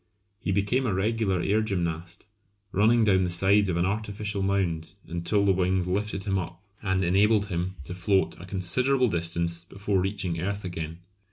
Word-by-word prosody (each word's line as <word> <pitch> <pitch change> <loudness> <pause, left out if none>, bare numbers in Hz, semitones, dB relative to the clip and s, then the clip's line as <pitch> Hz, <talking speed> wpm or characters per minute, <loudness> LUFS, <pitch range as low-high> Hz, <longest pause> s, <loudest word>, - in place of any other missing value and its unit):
He - - -2
became 105 +7 +1
a 105 - 0
regular 100 -2 0
air 105 +3 +2
gymnast, 85 -5 -3 0.5
running 110 +4 +4
down 95 -3 +4
the 90 - 0
sides 95 +3 +3
of 85 - 0
an 85 - +2
artificial 105 0 -2
mound 95 -3 -1
until 85 +5 0
the 95 - +4
wings 90 0 +1
lifted 100 +2 -2
him 95 -2 0
up 85 -1 -6 0.2
and 95 -2 0
enabled 100 +3 +3
him 90 +1 -2
to 85 - -7
float 95 +2 +1
a 90 - -9
considerable 125 +8 +1
distance 85 -1 -1
before 100 +1 -1
reaching 90 -3 -2
earth 100 +2 -3
again. 80 -1 -5
95 Hz, 170 wpm, -27 LUFS, 85-105 Hz, 0.5 s, running